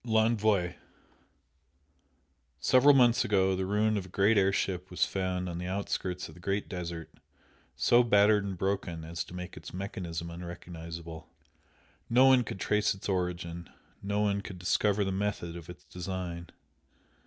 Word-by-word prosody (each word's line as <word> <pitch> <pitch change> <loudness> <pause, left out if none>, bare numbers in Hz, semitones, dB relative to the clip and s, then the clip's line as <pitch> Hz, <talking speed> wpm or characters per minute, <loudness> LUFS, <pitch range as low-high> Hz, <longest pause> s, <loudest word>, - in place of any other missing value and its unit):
L'Envoi 110 -5 +2 1.8
Several 135 +3 +6
months 120 -3 +5
ago 95 -2 +2
the 95 0 -2
ruin 105 +2 +2
of 95 -2 -4
a - - -15
great 100 +5 +3
air 100 -1 +4
ship 95 -2 -2
was 90 - +1
found 95 -1 -2
on 85 -1 -4
the 90 - -4
outskirts 95 -1 -3
of - - -13
the - - -15
Great 100 +3 -2
Desert 85 -3 -6 0.6
so 120 0 +5
battered 105 -2 +4
and 95 -2 -4
broken 95 -3 -2
as 80 +1 -4
to 90 - -11
make 90 0 -7
its - - -9
mechanism 90 -4 -5
unrecognisable. 85 -1 -8 0.8
No 125 +3 +6
one 130 -2 +6
could 100 - -6
trace 105 0 +1
its 95 - -8
origin, 90 -3 -3 0.3
no 100 +1 -1
one 100 -1 +1
could 95 -2 -8
discover 100 +3 +1
the 95 - -1
method 95 -3 -2
of 85 0 -9
its 90 - -11
design. 90 -2 -5
95 Hz, 155 wpm, -30 LUFS, 85-105 Hz, 1.8 s, Several